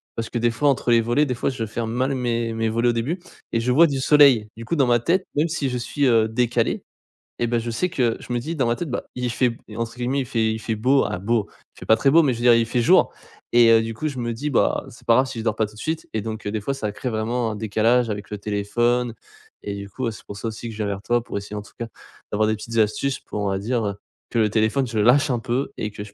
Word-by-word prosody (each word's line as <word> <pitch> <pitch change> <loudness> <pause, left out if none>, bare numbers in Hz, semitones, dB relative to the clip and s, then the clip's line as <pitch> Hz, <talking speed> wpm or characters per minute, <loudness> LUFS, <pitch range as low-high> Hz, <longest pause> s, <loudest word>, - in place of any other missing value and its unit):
parce 115 -1 -4
que 120 - -1
des 120 +1 +2
fois 145 +6 +2
entre 135 -2 0
les 115 -1 +5
volets, 120 +6 +2
des 125 - -1
fois, 120 - -1
je 115 -4 -3
ferme 110 +1 -3
mal 130 +3 0
mes 120 -2 -1
mes 115 0 0
volets, 115 +2 +1
au - - +4
début 135 +11 -2 0.3
et 115 - +1
je 120 +2 0
vois 160 +7 +7
du 135 -2 -2
soleil. 135 -6 +5
Du 115 - -8
coup 170 - -1
dans 135 -5 +3
ma 120 -1 +4
tête 180 +9 +1
même 155 +3 +2
si 150 -4 -1
je 125 - -2
suis, 140 +4 -1
heu, 115 -3 +4
décalé 120 +1 0 0.6
et 120 - +1
bah 120 0 +1
je 115 +1 -4
sais 115 +11 -1
que 120 -8 +1
je - - -9
me 120 - 0
dis 160 +7 -4
dans 135 - +1
ma 120 - 0
tête: 175 - -4
«bah, 125 - -3
il 125 -1 -2
fait 125 +1 +2
b 115 - -7 0.2
entre 115 +1 -4
guillemets 125 +3 0
il - - -3
fait 115 -3 0
il - - -3
fait 110 0 -2
beau, 130 +5 +3
ah - - -3
beau, 110 +2 0 0.3
il - - -16
fait - - -9
pas 110 - +5
très 140 - +3
beau, 165 +3 +6
mais 135 - +2
je 115 - -6
veux 120 - -4
dire, 120 - +7
il 115 - +3
fait 120 +1 0
jour.» - - +5 0.4
et 120 -1 +7
heu, 115 0 +6
du 115 0 -4
coup, 155 +8 -3
je 140 -4 -4
me 120 -1 -2
dis: 145 +6 -3
«bah 130 - +1
c'est - - -16
pas 115 - +5
grave 130 - +4
si 120 - -6
je 110 - -4
dors 110 - +1
pas 110 - +2
tout 105 - -12
de 110 - -12
suite» 160 0 -3
et 110 - -1
donc, 110 0 -6
heu, - - -1
des 110 -1 -2
fois 135 +6 -2
ça 110 -6 -3
crée 125 - -4
vraiment 115 +1 -1
un 105 - -5
décalage 115 +3 +2
avec 100 -2 -5
le 105 - -4
téléphone 115 +4 0 0.5
et 100 - -4
du 100 0 -7
coup, 130 +6 -4
bah, 115 - 0
c'est - - -12
pour 100 - -8
ça 115 - -4
aussi 110 +1 -6
que 115 - -7
je - - -10
viens 105 - -1
vers 100 -1 -3
toi 120 +3 +1
pour 100 - -5
essayer 100 +1 -6
en 105 - -4
tout - - -16
cas, 115 - -4 0.4
d'avoir 110 +1 +2
des 110 - +1
petites 115 +2 -6
astuces 115 +5 +1
pour 105 - -6
on 100 - -1
va 95 - -1
dire, 115 +2 -1
heu, 100 - -2 0.3
que 120 - 0
le 110 -1 +3
téléphone 110 +5 +1
je 115 - -4
le 105 - +3
lâche 140 +4 +5
un 125 - 0
peu 125 +4 -2
et 105 - -3
que 105 0 -7
je 100 - -14
115 Hz, 315 wpm, -23 LUFS, 110-125 Hz, 0.6 s, vois